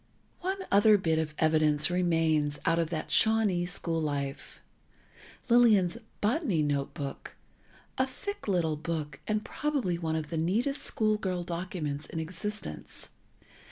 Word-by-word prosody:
One 380 +1 -3
other 205 +1 +6
bit 160 -4 +1
of 155 -1 -3
evidence 155 0 +3
remains 165 -4 +1
out 165 - +3
of 165 -2 0
that 160 -2 -4
Shawnee 215 -6 +3
school 165 -2 -1
life: 140 -2 -4 0.9
Lillian's 230 -5 +4 0.2
"Botany 210 - +1
Notebook"—a 145 - -5
thick 405 - -6
little 170 -6 +1
book, 155 -1 -4
and 215 0 -1
probably 270 - -1
one 160 -2 -1
of 155 -2 -3
the 165 - -3
neatest 225 - 0
school 215 -1 +1
girl 185 -4 -2
documents 170 -4 -4
in 160 - -5
existence. 175 - -5
175 Hz, 125 wpm, -29 LUFS, 155-215 Hz, 0.9 s, other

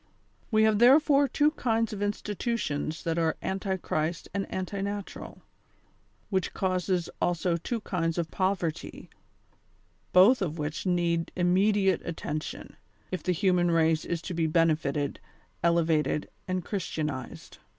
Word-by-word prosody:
We 220 -1 +4
have 215 -1 +3
therefore 280 +3 +6
two 295 +2 +2
kinds 230 -6 0
of 205 - -5
institutions 205 - -2
that 165 0 0
are 160 -1 +1
anti 190 0 -2
Christ 165 -1 -2
and 200 0 -3
anti 190 +1 -3
natural, 200 0 -6 0.9
which 190 -3 -1
cause 185 -2 0
also 175 0 +1
two 225 +7 -3
kinds 165 -5 -1
of 165 -2 -2
poverty, 185 -4 -2 1.0
both 205 +7 +6
of 170 -4 -2
which 150 +4 -3
need 170 -2 +1
immediate 190 +1 +3
attention, 155 -2 -5 0.3
if 185 - -3
the 180 - 0
human 180 0 +2
race 160 -1 +3
is 170 -1 -3
to 185 - -5
be 165 -1 +1
benefited, 155 -3 +1 0.4
elevated 165 -3 +2 0.2
and 185 -2 -2
Christianized. 155 - -4
180 Hz, 130 wpm, -28 LUFS, 165-200 Hz, 1.0 s, therefore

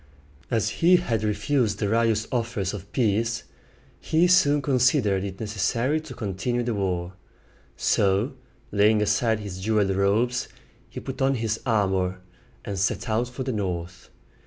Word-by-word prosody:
As 110 -2 +1
he 175 +2 +7
had 115 - 0
refused 105 +1 0
Darius' 110 +1 +1
offers 115 -6 -1
of 100 -1 -8
peace, 115 0 0 0.6
he 160 +2 +2
soon 150 -5 +4
considered 125 -7 +2
it 95 -1 -6
necessary 115 +7 0
to 150 -5 -10
continue 110 +4 -2
the 120 -1 -1
war: 90 -3 -2 0.6
so, 100 +7 +2 0.4
laying 105 +1 +4
aside 105 +1 +1
his 95 -3 -7
jeweled 105 0 +1
robes, 110 +6 +1 0.4
he - - -7
put - - -7
on 135 0 +3
his 110 -2 -1
armor 95 -4 +1 0.5
and 100 -2 -4
set 95 +6 -1
out 115 +3 0
for 125 +2 -5
the 130 -1 -2
north. 90 -3 -4
110 Hz, 140 wpm, -25 LUFS, 100-125 Hz, 0.6 s, he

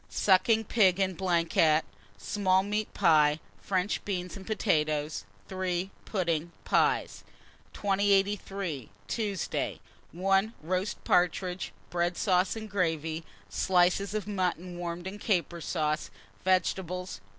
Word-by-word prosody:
Sucking 210 +4 +3
pig 195 -5 +3
en 190 -1 +1
blanquette, 165 -3 +2 0.3
small 190 - +2
meat 210 +1 -2
pie, 150 -1 +4 0.2
French 190 +1 -1
beans, 180 -3 -3
and 195 -1 -10
potatoes. 155 -8 0 0.2
3. 185 0 -2
Pudding, 170 -4 -1
pies. - - +1 0.5
2083. 195 - 0 0.2
Tuesday. 205 -6 -2 0.3
1. 195 +5 +1
Roast 185 +4 -2
partridges, 180 +1 +1 0.2
bread 175 0 0
sauce, 185 -1 +2
and 220 -1 -6
gravy; 165 -5 -1 0.2
slices 180 - +2
of 215 - -2
mutton 180 -3 -2
warmed 175 0 -4
in 195 +2 -6
caper 175 -5 0
sauce; 155 0 -1 0.3
vegetables. 185 - 0
185 Hz, 105 wpm, -29 LUFS, 170-195 Hz, 0.5 s, pie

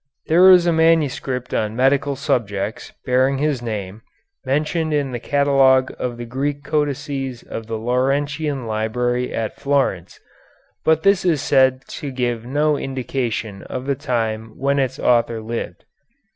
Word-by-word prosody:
There 180 +4 +6
is 180 -2 +7
a 170 - +3
manuscript 150 -6 +1
on 110 0 -1
medical 135 +2 +2
subjects, 110 -7 -2
bearing 130 +2 +2
this 145 -3 0
name, 105 -3 -5 0.4
mentioned 155 +3 0
in 140 -2 -1
the 120 - -4
catalogue 135 -1 +3
of 120 -1 -3
the 120 - -6
Greek 140 +4 -3
Codices 145 -4 -2
of 115 - -7
the 115 -1 -3
Laurentian 135 +4 -1
Library 120 +3 -1
at 110 -1 -3
Florence, 135 -11 -1 0.6
but 160 0 +2
this 195 -1 +4
is 170 -5 +2
said 130 -1 +3
to 145 - -6
give 120 -3 -2
no 150 +2 +1
indication 125 -6 -3
of 130 0 -6
the 140 - +1
time 115 -4 -3
when 140 +1 +1
its 130 -3 -1
author 120 -2 +2
lived. 115 +2 -6
130 Hz, 145 wpm, -20 LUFS, 120-145 Hz, 0.6 s, is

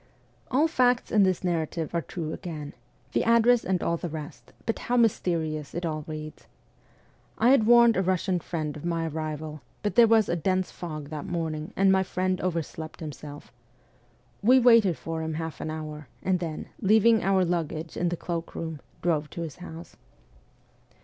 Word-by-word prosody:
All 285 +5 +3
facts 250 -5 +2
in 210 - +4
this 185 -2 +2
narrative 165 -2 -2
are 170 - +1
true 160 -1 -5
again 155 -4 -6 0.4
the - - +1
address 235 +1 +4
and 190 0 +1
the 170 0 -2
rest; 150 -2 -8
but 225 - -1
how 245 - 0
mysterious 160 -10 0
it 175 +1 -2
all 155 -2 -3
reads. 155 -1 -8 0.9
I 235 - +4
had 230 -6 +4
warned 235 -1 +7
a - - +2
Eussian 185 -1 0
friend 155 -4 -4
of 150 - -9
my 165 -1 -1
arrival, 155 -1 -5 0.2
but 205 - 0
there 235 -1 +7
was 220 -2 +4
a - - 0
dense 185 +3 0
fog 155 -4 -7
that 150 -2 -6
morning, 160 -2 -3
and 195 0 +4
my 190 0 +4
friend 185 0 -1
overslept 165 -2 -4
him 155 -2 -5
self. 145 +1 -11 0.9
We 250 +5 +6
waited 230 - +5
for 165 0 -4
him 160 -1 -3
half 160 0 -5
an - - -3
hour, 155 -2 -6 0.2
and 185 -1 +1
then, 165 -3 -5
leaving 220 +2 +5
our 190 0 +3
luggage 165 -2 -2
in 175 - 0
the 175 - -3
cloak 170 -1 -5
room, 160 -2 -4 0.2
drove 155 -3 +1
to 170 - -6
his 160 -4 -6
house. 170 -2 -10
170 Hz, 175 wpm, -27 LUFS, 155-195 Hz, 0.9 s, warned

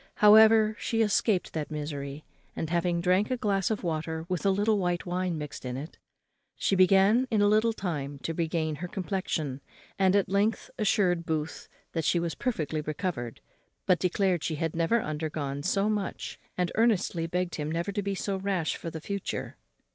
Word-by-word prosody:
However, 220 +1 +7
she 225 -1 +1
escaped 210 -2 +1
that 155 -2 -3
misery, 145 -1 -5 0.3
and, 160 - -3
having 170 0 +1
drank 185 +4 +2
a 255 - 0
glass 195 -4 0
of 220 -3 -2
water 160 -1 -2
with 180 -3 -2
a 200 - +3
little 205 +2 +2
white 175 -1 -1
wine 180 -1 -1
mixed 150 -2 -7
in 125 0 -4
it, 150 +5 -8 0.6
she 195 - +1
began 195 +6 +5
in 220 - +1
a 205 - +5
little 215 +2 +4
time 150 -9 -4
to 165 - -2
regain 160 -2 -1
her 180 +4 -5
complexion, 175 -8 -3 0.4
and 190 0 +4
at 200 - +3
length 200 +4 0
assured 185 -5 +2
Booth 155 -1 -3 0.2
that 165 - -2
she 170 - +2
was 170 -1 -2
perfectly 155 - -2
recovered, 150 - -4 0.4
but 180 -2 +3
declared 180 -2 +1
she 160 - -1
had 160 +1 -2
never 170 +8 +2
undergone 150 -2 -3
so 195 +5 +1
much, 210 -2 -3 0.2
and 180 -1 0
earnestly 200 -7 +1
begged 180 +1 -2
him 150 0 -3
never 170 +4 -1
to 205 +1 -2
be 200 0 -2
so 195 0 -2
rash 190 -4 -1
for 165 - -6
the 160 -1 -7
future. 200 +3 -4
180 Hz, 180 wpm, -28 LUFS, 160-200 Hz, 0.6 s, However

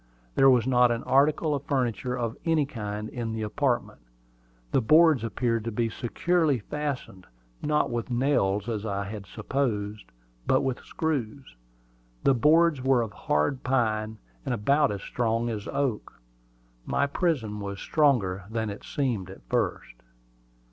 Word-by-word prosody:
There 135 - +6
was 125 -3 +4
not 125 -1 +4
an 120 0 -1
article 150 +3 +3
of 140 - -1
furniture 125 -3 -1
of 115 -2 -2
any 160 -3 +2
kind 105 -5 -5
in 115 -1 -4
the 110 -1 -3
apartment. 120 +3 -1 0.7
The - - +3
boards 155 0 +5
appeared 115 0 -1
to 115 - -2
be 115 +1 0
securely 155 +5 +1
fastened, 130 - -5 0.3
not 150 0 +1
with 120 +1 -3
nails, 120 -6 +1
as 110 -3 -2
I 100 -2 -2
had 100 0 -7
supposed, 105 -6 -2 0.4
but 130 - +4
with 130 -2 -2
screws. 140 - -3 0.7
The 135 - +5
boards 155 +3 +4
were 130 -2 +3
of 105 -3 -7
hard 75 - 0
pine, 110 -4 0 0.3
and - - -1
about 140 +5 +2
as 100 -1 -4
strong 115 0 -1
as 105 -2 -5
oak. 130 - -2 0.6
My 140 - +1
prison 140 - -1
was 100 -1 -5
stronger 110 - +1
than 110 -1 -2
it 100 - -9
seemed 120 -10 -2
at 95 - -12
first. 115 - -1
120 Hz, 150 wpm, -27 LUFS, 105-140 Hz, 0.7 s, There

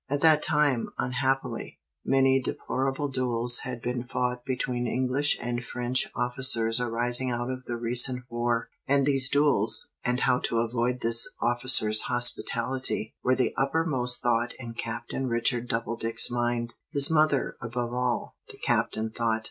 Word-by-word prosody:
At 145 +1 -2
that 155 -2 +5
time, 145 -5 0
unhappily, 130 +1 -2 0.3
many 135 0 +2
deplorable 135 +2 -3
duels 125 -2 +3
had 125 -2 -6
been 125 0 -3
fought 125 -1 -3
between 125 -2 -3
English 130 +4 0
and 120 0 -4
French 125 +2 -1
officers 120 -2 +1
arising 120 +1 -1
out 120 +1 -3
of 130 0 -7
the 120 - -4
recent 125 +2 +3
war; 120 -1 -2 0.2
and 140 0 +2
these 135 -2 +2
duels, 140 -8 +2
and 125 +1 -1
how 125 -1 +2
to 115 - -3
avoid 120 +2 -1
this 115 0 +3
officer's 120 -2 +4
hospitality, 120 0 +1
were 130 - +2
the 125 -3 0
uppermost 135 -3 0
thought 120 0 0
in 120 -2 -8
Captain 120 +3 -5
Richard 120 +1 +1
Doubledick's 115 0 +1
mind. 120 -1 -2 0.2
"His 140 +2 +5
mother, 155 -3 +1
above 120 +1 -4
all," 125 -1 -3
the - - -11
Captain 110 0 -1
thought. 115 -1 -1
125 Hz, 145 wpm, -26 LUFS, 120-130 Hz, 0.3 s, that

